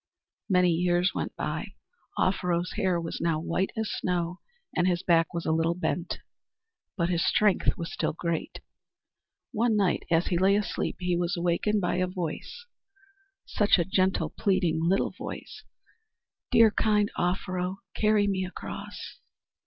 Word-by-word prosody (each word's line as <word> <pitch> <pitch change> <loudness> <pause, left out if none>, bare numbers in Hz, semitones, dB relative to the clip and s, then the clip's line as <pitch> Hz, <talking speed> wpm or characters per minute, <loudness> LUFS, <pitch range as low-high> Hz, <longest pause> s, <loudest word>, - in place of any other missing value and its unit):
Many 180 -2 +4
years 175 +2 +2
went - - -4
by. - - -4 0.4
Offero's 180 -2 +1
hair 190 -5 0
was 165 -1 -5
now 165 -2 +1
white 170 +4 -1
as 220 -1 -1
snow 180 0 -2 0.4
and 180 0 +2
his 175 -1 0
back 165 -2 +3
was 170 -1 -4
a - - +1
little 165 +1 +1
bent. 180 -1 -2 0.8
But 170 -1 +1
his 170 -2 +1
strength 210 -3 +2
was 170 -1 -5
still - - -1
great. 170 0 -3 0.9
One 230 -1 +1
night, 195 -4 +2
as 165 0 +3
he 175 - 0
lay 195 +2 +4
asleep, 210 0 -1
he 180 -1 0
was 175 +2 -1
awakened 175 +5 +1
by 175 -1 0
a 185 0 +1
voice, 180 - -5 0.8
such 210 -1 +3
a 170 - +1
gentle, 185 -4 +1
pleading 180 -5 +1
little 185 +4 +2
voice - - -8 0.8
"Dear, 225 -2 +6
good, - - -1
kind 210 -1 +3
Offero, 180 +1 -2
carry 215 -1 +3
me 195 -2 0
across!" 180 - -7
180 Hz, 150 wpm, -28 LUFS, 170-195 Hz, 0.9 s, Dear